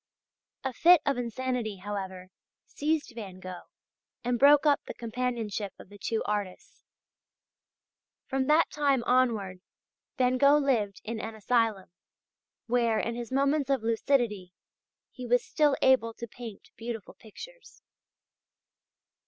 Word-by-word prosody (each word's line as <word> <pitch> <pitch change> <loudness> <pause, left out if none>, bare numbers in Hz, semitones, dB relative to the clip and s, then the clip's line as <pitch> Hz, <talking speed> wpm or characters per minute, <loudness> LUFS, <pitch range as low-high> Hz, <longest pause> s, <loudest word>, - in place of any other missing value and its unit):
A 265 -1 -2
fit 345 +6 +6
of 275 -3 +1
insanity, 245 -2 -2
however, 190 -1 -6 0.4
seized 305 -1 -2
Van 200 -5 -8
Gogh 185 -1 -9 0.5
and 245 0 0
broke 285 +2 +6
up 290 -2 +4
the - - -6
companionship 230 -4 -3
of - - -14
the 205 0 -14
two 225 +2 -1
artists. 205 -3 -4 1.4
From 265 0 -1
that 310 +2 +4
time 280 -4 +1
onward, 220 -8 +1 0.6
Van 255 0 +2
Gogh 280 +2 +6
lived 230 -9 0
in 225 0 -4
an 220 0 -6
asylum, 220 -4 0 0.7
where 235 -2 +1
in 230 - -2
his 240 +1 -6
moments 275 +1 +1
of 270 -5 +1
lucidity 225 -5 0 0.6
he 250 -2 -8
was 245 +1 +2
still 295 -2 +2
able 230 -4 +3
to 235 - -6
paint 230 -3 -10
beautiful 225 -3 -6
pictures. 485 - -13
235 Hz, 130 wpm, -28 LUFS, 210-270 Hz, 1.4 s, fit